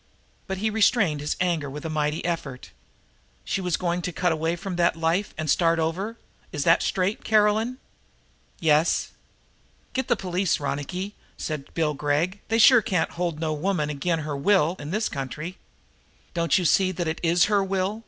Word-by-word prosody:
But 190 - -3
he 215 +3 0
restrained 205 - +2
his 145 - -2
anger 170 -5 0
with 150 +3 -7
a - - 0
mighty 150 0 -1
effort. 150 -7 -4 0.7
"She 195 - -1
was 180 -3 0
going 175 0 -1
to 180 - -3
cut 175 +1 0
away 160 +1 0
from 180 +1 -5
that 170 -1 +3
life 165 +5 0
and 155 - -3
start 165 +3 +3
over 185 +8 -2 0.3
is 145 - -2
that - - +4
straight, 190 +2 -1
Caroline?" 220 +3 +2 0.8
"Yes." 155 0 +2 0.8
"Get 260 -1 -1
the - - +3
police, 185 -1 0
Ronicky," 150 +8 -3 0.2
said 150 -3 -5
Bill 155 -2 +1
Gregg. 150 +7 0
"They 225 - +1
sure 235 +2 +7
can't 180 -5 0
hold 170 -3 -3
no 160 -1 -1
woman 155 -1 -1
agin' 160 +3 -1
her 150 -1 -4
will 175 +2 +3
in 145 - -6
this 215 +5 0
country." 150 +7 -6 0.7
"Don't 170 -1 +2
you 180 - 0
see 185 +4 +4
that 175 -2 -3
it 160 - -2
is 170 +1 +3
her 205 -2 +2
will?" 195 +2 -1
175 Hz, 175 wpm, -25 LUFS, 155-195 Hz, 0.8 s, sure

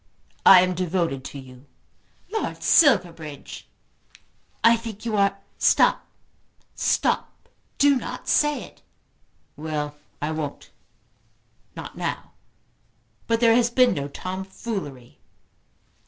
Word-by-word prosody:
"I 185 -2 +10
am 185 0 +1
devoted 170 -6 -2
to 140 - -8
you." 130 0 -13 0.6
"Lord 440 - -3
Silverbridge!" 165 - +2 1.0
"I 230 0 +7
think 225 -2 -8
you 225 -2 -1
are 200 -1 +2
" - - -40
"Stop, - - +3 0.7
stop. - - -1 0.3
Do 285 -1 +4
not - - -7
say 295 0 +2
it." - - -15 0.7
"Well 150 -1 -4 0.3
I 150 +2 -2
won't; 155 -2 -6 1.0
not - - -8
now. - - -4 1.0
But 230 0 +1
there 230 -1 +6
has 240 -1 +3
been 250 0 +4
no 140 -1 -3
tomfoolery." 185 - -7
185 Hz, 110 wpm, -24 LUFS, 150-230 Hz, 1.0 s, I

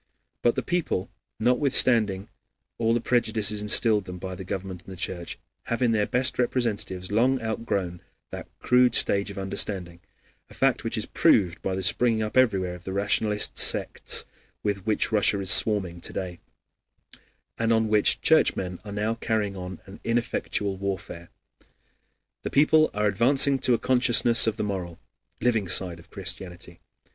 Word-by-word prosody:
But 120 - +2
the - - -2
people, 175 - -2 0.3
notwithstanding 120 -5 +2 0.5
all 115 0 +1
the - - +1
prejudices 110 -3 +1
instilled 105 -1 +4
into - - -6
them - - -8
by 95 +1 -7
the 95 - -8
government 95 -1 -6
and - - -12
the 95 - -9
Church, 85 -2 -5 0.3
have 120 +2 -2
in 120 - +2
their 105 -2 0
best 130 +1 +2
representatives 105 -7 -2
long 125 +5 +2
outgrown 100 -6 -4 0.3
that - - -8
crude 125 -1 +3
stage 100 +1 +3
of 100 - -9
understanding, 95 -2 -2 0.5
a - - -15
fact - - +1
which - - -3
is - - -1
proved 90 -4 +2
by 95 - -3
the 95 - -4
springing 110 +2 +2
up 105 - -5
everywhere 100 -8 +2
of 90 0 -12
the 95 - -6
rationalist 105 +1 0
sects - - +1 0.4
with 100 -1 -3
which 110 +1 +1
Russia 105 -1 +2
is 95 -3 +2
swarming 95 -6 +3
to - - -6
day, 90 -2 -6 1.2
and 115 0 0
on 110 -1 +2
which 105 -1 +2
Churchmen 90 -1 +2
are 105 - -9
now 105 +2 -2
carrying 110 -3 -2
on 90 0 -8
an 95 0 -13
ineffectual 115 -4 -2
warfare. 95 -3 -6 1.1
The - - -5
people 155 +2 +3
are 105 0 0
advancing 135 +7 +3
to 125 -1 +3
a - - -1
consciousness 125 -1 +3
of 110 0 -1
the - - -2
moral, 90 -5 -5 0.4
living 110 -5 +1
side 90 -1 0
of 85 - -18
Christianity. 90 -1 -7
105 Hz, 165 wpm, -25 LUFS, 95-115 Hz, 1.2 s, instilled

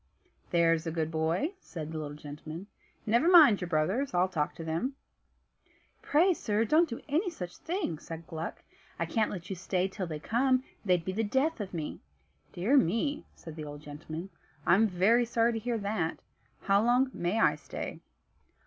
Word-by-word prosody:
"That's 165 -1 +3
a - - -1
good 160 -1 -1
boy," 165 - 0
said 160 - -7
the 160 - -4
little 145 -1 -6
gentleman. 155 +4 -8 0.4
"Never 235 +10 +3
mind 305 - +8
your 180 - -2
brothers. 180 - 0
I'll 180 +1 +4
talk 155 -5 -2
to 165 - -7
them." 165 - -2 1.1
"Pray, 345 +6 +4
sir, 220 -7 0
don't 320 +7 +4
do 230 - -5
any 325 +7 +1
such 180 - -7
thing," 330 - -3
said 165 0 -8
Gluck. 165 -1 -6 0.3
"I - - -1
can't 220 -3 +1
let 185 -1 -6
you - - -2
stay 185 +1 0
till 190 -1 -5
they 155 -2 -4
come; 255 - +2 0.2
they'd 180 -4 +2
be 185 - -1
the 225 +3 0
death 265 +6 +1
of 195 - -5
me." 160 -4 -4 0.5
"Dear 210 +11 +2
me," 250 - +1
said 160 -2 -10
the 155 -2 -6
old 145 0 -8
gentleman, 155 +5 -7 0.3
"I'm 205 +6 +5
very 205 +6 +3
sorry 235 0 +2
to 225 - -2
hear 235 +1 -1
that. 200 -6 -1 0.4
How 200 +1 +3
long 250 +3 +3
may 175 +6 -1
I - - +5
stay?" - - -6
190 Hz, 180 wpm, -30 LUFS, 165-240 Hz, 1.1 s, mind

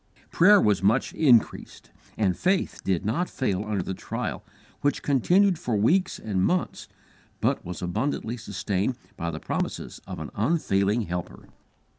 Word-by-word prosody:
Prayer 205 +4 +6
was 105 - +2
much 110 +7 +2
increased, 125 -8 +2 0.3
and 95 -4 +1
faith 185 +1 0
did 95 -2 0
not 170 - 0
fail 100 -7 -1
under 105 -3 -2
the 95 - -4
trial, - - -5 0.4
which 145 - 0
continued 175 - +3
for 120 -9 -2
weeks 160 - +2
and 95 -4 -1
months, 180 - -1 0.5
but - - 0
was 90 0 -6
abundantly 115 +5 -2
sustained 100 +1 -2 0.2
by 85 - -3
the 80 -1 -5
promises - - -4
of - - -6
an - - -7
unfailing 105 -5 +1
Helper. 90 -2 -6
110 Hz, 145 wpm, -26 LUFS, 95-150 Hz, 0.5 s, Prayer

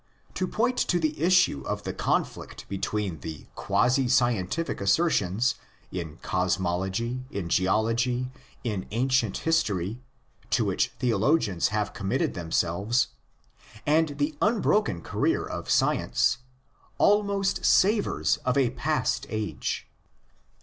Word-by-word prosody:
To 185 - -1
point 245 +6 0
to 175 - +2
the 155 -2 0
issue 185 - +4
of - - -3
the - - -4
conflict - - -2
between 100 -3 -3
the 80 -1 -7
quasi 125 +1 +2
scientific 120 - +1
assertions, 105 - +2 0.4
in 85 -4 -5
cosmology, 95 +7 -1
in 95 -9 -4
geology, 115 +7 +1 0.3
in 105 -6 -3
ancient 120 -2 +1
history, 110 - 0 0.5
to 115 - +2
which 95 -2 +1
theologians 115 - +2
have 105 0 -2
com 100 - -5
mitted - - 0
themselves, 90 +8 0 0.8
and 150 -1 +2
the 145 +1 -1
unbroken 210 - +2
career - - 0
of - - -6
science, - - +2 0.6
almost 200 -1 +2
savours 205 +2 +3
of 125 +1 -1
a 130 -4 +3
past - - -1
age. 110 -2 -3
120 Hz, 115 wpm, -27 LUFS, 95-155 Hz, 0.8 s, issue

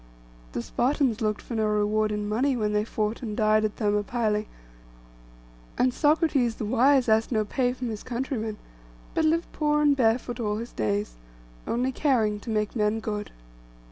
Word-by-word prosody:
The 120 - -3
Spartans 255 - 0
looked 215 -1 -1
for - - -7
no 220 -1 +1
reward 210 0 +1
in 210 0 -2
money 250 +5 +1
when 210 -2 0
they 210 0 +2
fought 215 +1 -2
and 215 -4 -5
died 215 0 +3
at 215 -1 -1
Thermopylæ; 210 0 0 1.3
and 255 0 +2
Socrates 295 -6 +2
the 220 - -4
wise 260 +4 +3
asked 220 +2 +2
no 215 -2 +1
pay 245 +3 0
from 250 -1 -4
his 215 -2 -5
countrymen, 240 -3 -3 0.6
but 320 - +1
lived 330 +2 +1
poor 300 -1 +1
and 295 -1 +4
barefoot 240 0 +1
all 210 -2 -1
his 235 +2 -6
days, 105 - -2 0.5
only 250 +3 0
caring 230 -7 +1
to 230 - -9
make 215 0 -1
men 215 0 +1
good. 210 -1 -4
225 Hz, 170 wpm, -26 LUFS, 210-255 Hz, 1.3 s, and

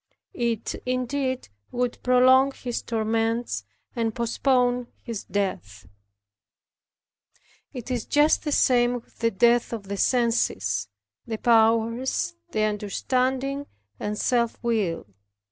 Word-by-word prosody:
It 235 - -2
indeed 255 - -2 0.2
would 245 -1 -2
prolong 260 +2 +5
his 245 -3 -4
torments, 225 +1 -1 0.3
and 225 -2 -1
postpone 245 +1 +1 0.2
his 230 -4 -5
death. 105 - -3 1.9
It 250 -1 -7
is 245 -3 -2
just 295 +1 +3
the 300 - -2
same 245 -3 +3
with 240 - -11
the 230 - +2
death 235 +3 +3
of 210 -4 -6
the 200 - -3
senses, 195 - +1 0.4
the 225 -1 -3
powers, 230 - +2 0.2
the 215 - 0
understanding, 255 +6 -1 0.3
and 210 0 -3
self 235 0 +1
will. 215 -8 0
235 Hz, 110 wpm, -25 LUFS, 220-255 Hz, 1.9 s, prolong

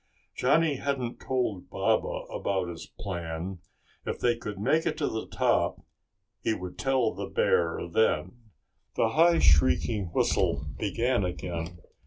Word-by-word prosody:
Johnny 160 -3 +3
hadn't 130 -4 -2
told 125 -8 -2
Baba - - 0
about 95 -3 -1
his 85 -1 -8
plan. 85 0 -5 0.4
If - - -3
they 120 -1 +2
could 105 -3 -6
make 160 +11 +2
it 160 - -1
to - - 0
the 110 - -3
top - - +1 0.6
he 110 - +1
would 90 -2 -7
tell 130 -4 +2
the - - -5
bear 85 -1 +2
then. 110 +7 +2 0.6
The 110 - +2
high 165 +6 +5
shrieking 85 - +3
whistle 75 -3 +1
began 120 +2 +1
again. 85 -1 -4
105 Hz, 135 wpm, -28 LUFS, 85-125 Hz, 0.6 s, high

